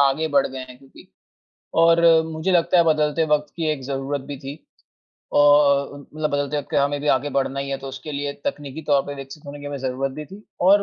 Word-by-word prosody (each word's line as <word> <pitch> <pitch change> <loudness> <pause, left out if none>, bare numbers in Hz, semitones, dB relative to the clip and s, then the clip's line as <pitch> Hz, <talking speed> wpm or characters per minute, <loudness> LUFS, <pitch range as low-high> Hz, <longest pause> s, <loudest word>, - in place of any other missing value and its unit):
आगे 140 +3 +2
बढ़ 140 -2 +3
गए 135 0 -7
हैं 125 - -12
क्योंकि। 135 0 -17 0.7
और 165 0 +5 0.2
मुझे 160 +3 -2
लगता 175 0 +3
है 170 - +6
बदलते 155 0 +2
वक़्त 150 -1 0
की 165 -2 -2
एक 150 -3 -4
ज़रूरत 135 +1 -3
भी 145 - -6
थी। 140 +4 -9 0.7
और 145 -1 +5
अ, - - -9 0.2
मतलब 155 -1 -1
बदलते 145 0 -1
वक़्त 145 - -6
में - - +3
हमें 140 +1 0
भी 150 - -2
आगे 145 +2 +2
बढ़ना 135 0 0
ही 140 - -4
है 135 - -1
तो 135 - -8
उसके 135 +3 -7
लिए 145 0 -3
तकनीकी 145 +1 -4
तौर 140 -2 +4
पे 145 - -5
विकसित 135 +2 -10
होने 145 +1 -8
की 145 - -8
हमें 145 0 -4
ज़रूरत 135 +1 -2
भी 150 +3 -7
थी। 195 +6 -13 0.2
और 195 +3 +5
145 Hz, 235 wpm, -22 LUFS, 140-155 Hz, 0.7 s, है